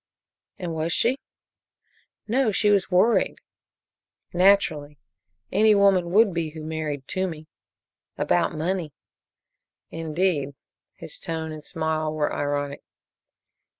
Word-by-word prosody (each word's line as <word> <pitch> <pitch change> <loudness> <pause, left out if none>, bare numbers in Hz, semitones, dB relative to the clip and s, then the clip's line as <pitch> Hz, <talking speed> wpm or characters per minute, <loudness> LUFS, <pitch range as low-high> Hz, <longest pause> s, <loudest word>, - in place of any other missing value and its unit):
"And 175 -3 -4
was 160 +1 -2
she?" 250 +10 +2 1.1
"No 240 0 +2
she 210 +1 +2
was 200 -2 +2
worried." 190 +6 +3 1.0
"Naturally. 175 -6 +3 0.5
Any 215 +2 +5
woman 195 -3 +4
would 205 +1 +4
be 165 -2 -1
who 155 0 -9
married 155 -3 -4
Toomey." 175 -5 -3 0.7
"About 90 - +1
money." 165 -1 -2 1.0
"Indeed." 160 -3 -1 0.4
His - - -8
tone 160 -1 -4
and 155 -1 -8
smile 155 0 -2
were 155 -1 -1
ironic. 145 0 -2
165 Hz, 105 wpm, -25 LUFS, 155-190 Hz, 1.1 s, Any